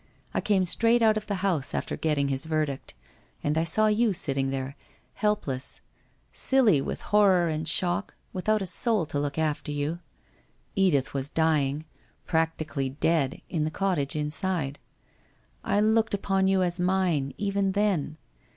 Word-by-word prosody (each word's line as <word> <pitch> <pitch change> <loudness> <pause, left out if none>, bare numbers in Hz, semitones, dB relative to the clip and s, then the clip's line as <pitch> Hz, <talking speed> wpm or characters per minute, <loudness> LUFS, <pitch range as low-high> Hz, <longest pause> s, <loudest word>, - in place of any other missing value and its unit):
I - - 0
came 195 -3 +2
straight 230 +6 +3
out 220 -1 +5
of 215 0 -4
the 205 - -1
house 160 -9 +2
after - - -2
getting 145 -3 0
his 135 +1 -2
verdict, 155 -4 -2 0.5
and 145 +1 0
I 160 - +2
saw 190 +7 +3
you 215 0 +2
sitting 135 -5 +1
there, 135 0 -4 0.4
helpless, 200 -12 -2 0.5
silly 235 - +3
with - - -4
horror 190 -4 +5
and 155 0 -3
shock, 175 +4 0 0.2
without 210 +2 0
a - - -3
soul 200 +1 +1
to 145 - -3
look 145 0 -3
after 155 -2 -1
you. 145 +3 -2 0.8
Edith 180 -10 +2
was 135 0 -2
dying 155 -2 +1 0.2
— - - -38
practically 160 -4 -1
dead 140 0 0
— - - -40
in 160 -3 0
the 155 - 0
cottage 165 -5 -1
inside. 150 -1 -2 0.8
I 205 - +1
looked 220 0 +2
upon 195 -1 +1
you 190 -1 +3
as 175 0 -1
mine, 180 -6 0
even 200 -1 0
then. 190 -7 0
165 Hz, 160 wpm, -27 LUFS, 145-200 Hz, 0.8 s, out